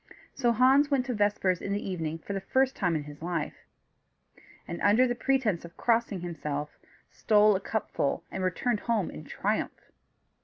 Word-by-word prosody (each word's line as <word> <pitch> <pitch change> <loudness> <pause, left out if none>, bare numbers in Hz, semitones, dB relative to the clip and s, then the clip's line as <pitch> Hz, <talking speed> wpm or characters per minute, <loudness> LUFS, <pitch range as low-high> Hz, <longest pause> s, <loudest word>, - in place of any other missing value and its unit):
So 240 -3 +2
Hans 265 +5 +4
went 270 -3 +1
to 255 - -2
vespers 205 -4 +1
in 200 - -2
the 205 - -3
evening 165 -4 -3
for 180 +5 -7
the 195 - -3
first 260 +7 +1
time 175 -4 0
in 150 - -2
his 145 0 -11
life, 170 -3 -2 1.1
and, 170 - -6
under 240 +5 +4
pretence 245 -8 0
of 170 0 -12
crossing 230 -5 +1
himself, 150 -4 -4 0.4
stole 210 -1 +4
a - - 0
cupful 200 -8 -2
and 190 - -3
returned 210 +5 0
home 225 -6 -1
in 75 - -9
triumph. - - -3
200 Hz, 165 wpm, -28 LUFS, 170-240 Hz, 1.1 s, Hans